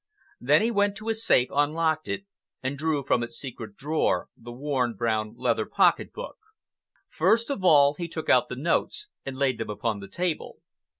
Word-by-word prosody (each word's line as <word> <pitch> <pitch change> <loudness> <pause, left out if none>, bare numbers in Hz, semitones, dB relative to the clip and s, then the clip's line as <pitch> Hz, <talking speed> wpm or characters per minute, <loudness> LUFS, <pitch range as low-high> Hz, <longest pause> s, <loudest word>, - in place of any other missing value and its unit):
Then 145 - +4
he 230 - +1
went 205 -2 +2
to 215 +1 -6
his 225 0 -1
safe, 125 - +4
unlocked 155 +2 +1
it, 200 - -3 0.4
and 130 +2 -2
drew 150 -1 -1
from 125 - +2
its 120 0 -5
secret 115 -6 -8
drawer 150 +5 0
the 120 +1 -11
worn 125 -2 -1
brown 110 0 -1
leather - - 0
pocket - - +2
book. - - -8 0.7
First 230 +4 +2
of 235 -9 -3
all 145 -5 +6
he 170 +3 -5
took 160 -1 -6
out 125 - +4
the - - -4
notes 165 - -1 0.2
and 135 -1 -5
laid 130 -3 +1
them 115 - -4
upon 105 +1 -2
the 100 - -9
table. 175 - -3
145 Hz, 185 wpm, -26 LUFS, 120-170 Hz, 0.7 s, all